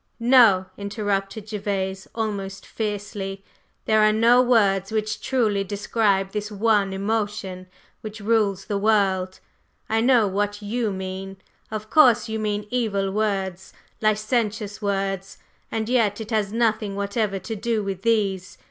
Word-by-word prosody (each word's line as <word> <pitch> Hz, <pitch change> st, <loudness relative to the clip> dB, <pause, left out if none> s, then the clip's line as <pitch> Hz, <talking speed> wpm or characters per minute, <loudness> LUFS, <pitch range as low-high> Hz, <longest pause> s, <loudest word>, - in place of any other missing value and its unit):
"No!" 230 Hz, -6 st, +6 dB
interrupted 200 Hz, +1 st, -3 dB
Gervase, 195 Hz, -2 st, -3 dB
almost 200 Hz, -4 st, -4 dB
fiercely. 205 Hz, -2 st, -4 dB, 0.4 s
"There 215 Hz, 0 st, +3 dB
are 215 Hz, 0 st, +5 dB
no 230 Hz, +3 st, +5 dB
words 200 Hz, -6 st, +2 dB
which 215 Hz, 0 st, -2 dB
truly 215 Hz, -6 st, +1 dB
describe 200 Hz, -1 st, 0 dB
this 210 Hz, +1 st, -4 dB
one 205 Hz, -1 st, +2 dB
emotion 200 Hz, -2 st, -3 dB, 0.3 s
which 215 Hz, 0 st, -7 dB
rules 205 Hz, -3 st, +1 dB
the 200 Hz, -1 st, -2 dB
world. 195 Hz, -3 st, +1 dB, 0.5 s
I 225 Hz, 0 st, +1 dB
know 240 Hz, -2 st, +4 dB
what 205 Hz, +1 st, -1 dB
you 215 Hz, +1 st, -2 dB
mean, 190 Hz, 0 st, -6 dB, 0.3 s
of 215 Hz, 0 st, -6 dB
course; 245 Hz, -7 st, +5 dB
you 220 Hz, 0 st, -3 dB
mean 210 Hz, -1 st, -2 dB
evil 200 Hz, -6 st, 0 dB
words, 190 Hz, -3 st, -2 dB, 0.3 s
licentious 215 Hz, -1 st, 0 dB
words, 195 Hz, -1 st, -2 dB, 0.3 s
and 220 Hz, -1 st, -2 dB
yet 225 Hz, -4 st, +2 dB
it 220 Hz, +1 st, -7 dB
has 210 Hz, -3 st, 0 dB
nothing 220 Hz, -3 st, 0 dB
whatever 200 Hz, 0 st, -1 dB
to 195 Hz, +4 st, -5 dB
do 220 Hz, 0 st, -1 dB
with 195 Hz, -2 st, -4 dB
these. 200 Hz, -5 st, 0 dB
205 Hz, 135 wpm, -23 LUFS, 195-220 Hz, 0.5 s, No